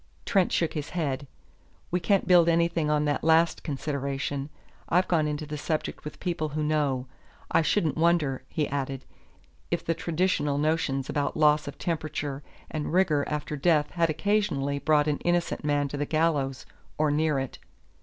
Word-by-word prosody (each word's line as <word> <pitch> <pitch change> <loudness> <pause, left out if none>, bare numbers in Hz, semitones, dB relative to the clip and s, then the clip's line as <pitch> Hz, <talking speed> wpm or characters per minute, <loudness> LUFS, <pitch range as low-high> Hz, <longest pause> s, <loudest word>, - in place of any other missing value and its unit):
Trent 195 -6 +2
shook 165 - +1
his 150 -1 -4
head. 140 -3 -2 0.6
"We 180 - +1
can't 195 +3 +1
build 175 -2 +6
anything 170 -2 +2
on 150 0 +2
that 145 0 0
last 160 +1 +3
consideration. 140 -1 -3 0.4
I've 180 +2 +3
gone 160 -3 +2
into 150 +1 -3
the 150 0 -5
subject 155 +1 -3
with 150 - -8
people 170 -4 -2
who 155 +1 -2
know. 145 -4 0 0.5
I - - +4
shouldn't 155 -2 +1
wonder," 160 -6 +2
he 150 -2 -1
added, 135 -1 -3 0.6
"if - - -2
the 165 - +1
traditional 165 -3 0
notions 145 -3 0
about 145 -1 -1
loss 150 -1 +4
of 145 - -7
temperature 150 -4 -3 0.3
and 150 -2 -3
rigor 170 -5 +3
after 150 0 -3
death 150 0 +2
had 170 -2 +1
occasionally 150 -6 0
brought 150 0 +3
an 150 -1 0
innocent 175 -2 0
man 145 -1 +1
to 145 - -5
the 145 0 -2
gallows, 150 -5 0 0.3
or 150 -1 +2
near 150 0 +1
it. 135 -1 -4
150 Hz, 165 wpm, -27 LUFS, 145-165 Hz, 0.6 s, build